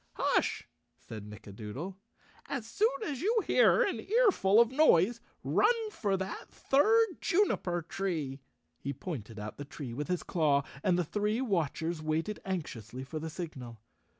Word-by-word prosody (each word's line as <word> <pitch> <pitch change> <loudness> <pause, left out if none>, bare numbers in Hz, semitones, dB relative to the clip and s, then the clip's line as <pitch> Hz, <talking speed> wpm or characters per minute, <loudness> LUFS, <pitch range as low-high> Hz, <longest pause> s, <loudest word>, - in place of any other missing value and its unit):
"Hush," - - 0 0.3
said 105 -2 -9
Nickadoodle. 105 - -7 0.5
"As 245 -6 -3
soon 415 - +2 0.2
as 285 -3 -3
you 440 +4 +2
hear - - +5
an - - -1
ear 460 +1 +4
full 195 - +4
of 235 0 +5
noise 240 - +4 0.2
run 485 - +3 0.2
for 200 - 0
that 190 +1 -5
third 430 +8 +3
juniper 185 - +1
tree." 160 -7 -3 0.4
He 140 - -4
pointed 120 - -6
out 105 +4 -7
the - - -4
tree 135 -3 -7
with 145 +4 -4
his 180 -1 -1
claw 145 -5 +2 0.2
and 180 -2 +3
the 180 - +1
three 210 +6 0
watch¬ 170 - 0
ers 170 -2 -3
waited 160 +7 -1
anxiously 130 - -5
for 155 +4 -5
the 160 +1 -5
signal. 140 -9 -7
175 Hz, 155 wpm, -31 LUFS, 140-230 Hz, 0.5 s, hear